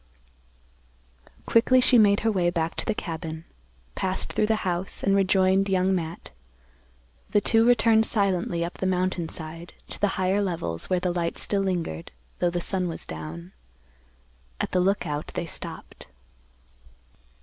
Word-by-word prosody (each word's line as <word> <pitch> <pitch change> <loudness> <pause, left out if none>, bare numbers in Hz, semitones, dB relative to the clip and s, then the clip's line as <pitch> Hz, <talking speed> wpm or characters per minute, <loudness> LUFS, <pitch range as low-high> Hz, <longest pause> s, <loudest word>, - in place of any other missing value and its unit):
Quickly 255 +3 +4
she 250 -1 +5
made 205 -1 +4
her 225 - +2
way 180 -4 +1
back 165 -1 -1
to - - -1
the 220 - 0
cabin, 160 -2 -5 0.5
passed 190 0 -1
through 215 - +1
the 220 -1 0
house, 180 +1 -1
and 195 0 +3
rejoined 190 0 +3
Young 190 0 +2
Matt. 170 -2 -4 1.0
The 205 - +3
two 225 +2 +3
returned 225 -2 +4
silently 180 -5 0
up 175 - -8
the 190 - 0
mountain 185 -2 -1
side, 165 +2 -8 0.2
to - - -8
the 205 - +4
higher 190 +2 +1
levels, 160 - -2
where 185 -1 +2
the 180 0 -1
light 170 -1 -2
still 200 -1 +2
lingered, 170 - -3 0.3
though 175 - +2
the 175 0 -2
sun 185 0 -1
was 165 - -5
down. 80 +3 -8 1.1
At - - -2
the 185 - +2
Lookout 180 -6 -1
they - - -2
stopped. 165 - -7
185 Hz, 150 wpm, -25 LUFS, 170-200 Hz, 1.1 s, she